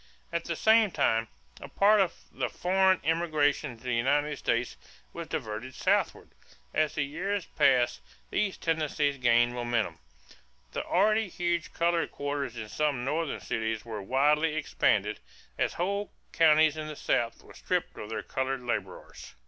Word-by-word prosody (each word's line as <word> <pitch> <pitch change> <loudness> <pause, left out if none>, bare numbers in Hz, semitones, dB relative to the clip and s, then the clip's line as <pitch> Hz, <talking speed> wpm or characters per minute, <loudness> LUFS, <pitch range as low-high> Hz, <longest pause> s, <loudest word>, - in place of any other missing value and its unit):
At 170 0 -1
the 170 - -2
same 220 +3 +5
time 115 -9 +1 0.3
a - - -9
part 205 +1 +4
of 185 - 0 0.2
the - - -2
foreign 190 +1 +2
immigration 155 -3 +1
into 115 - -17
the 125 -1 -2
United 145 +5 +1
States 120 +1 -1 0.4
was - - -6
diverted 110 +4 -5
southward. - - 0 0.4
As 155 -1 +1
the 150 - +1
years 185 +6 -3
passed 125 -3 +2 0.3
these 200 -3 0
tendencies 150 -3 0
gained 120 0 +4
momentum. 120 -2 -1 0.7
The - - -3
already 215 +3 +2
huge 175 -1 -2
colored 170 0 +1
quarters 140 -4 -3
in 110 -2 -5
some 145 -2 -1
Northern 155 +2 -2
cities 110 0 -2
were 110 -3 -5
widely 150 +8 +2
expanded, 105 -8 +1 0.4
as - - +1
whole 200 +3 -2 0.2
counties 155 -1 +5
in 155 0 -4
the 155 - -6
South 115 -4 -1
were - - -15
stripped - - -2
of 105 - -8
their 110 - -4
colored 130 -1 -2
laborers. 105 -6 -5
145 Hz, 150 wpm, -29 LUFS, 120-170 Hz, 0.7 s, same